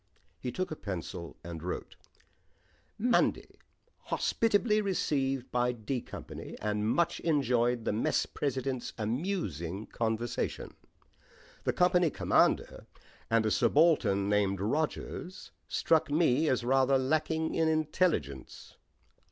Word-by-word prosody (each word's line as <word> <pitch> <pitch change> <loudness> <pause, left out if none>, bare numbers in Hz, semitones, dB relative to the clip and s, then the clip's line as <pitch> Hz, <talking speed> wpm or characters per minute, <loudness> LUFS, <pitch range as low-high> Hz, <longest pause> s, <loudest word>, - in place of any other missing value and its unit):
He 125 - -4
took 185 +4 -3
a - - -3
pencil 90 - -6
and 85 -2 -7
wrote: 90 +2 -5 1.0
"Monday 235 +2 +1 0.5
Hospitably 215 -1 +2
received 135 -9 -1
by 125 0 +1
'D' 120 +2 -3
Company - - -8
and 105 0 -1
much 170 +7 +1
enjoyed 125 -6 +1
the - - 0
mess 110 - +1
president's 135 -3 -3
amusing 110 - -3
conversation. 115 +1 -2 0.9
The - - +1
company 180 -1 +3
commander - - +1 0.4
and 115 -1 +3
a 110 - +1
subaltern 120 -7 +3
named 100 -2 +1
Rogers 155 - -3 0.2
struck 160 -2 +2
me 155 -1 +3
as 130 -2 +1
rather 135 +2 +3
lacking 155 +4 0
in 160 - +2
intelligence. 155 - -1
130 Hz, 110 wpm, -30 LUFS, 110-160 Hz, 1.0 s, company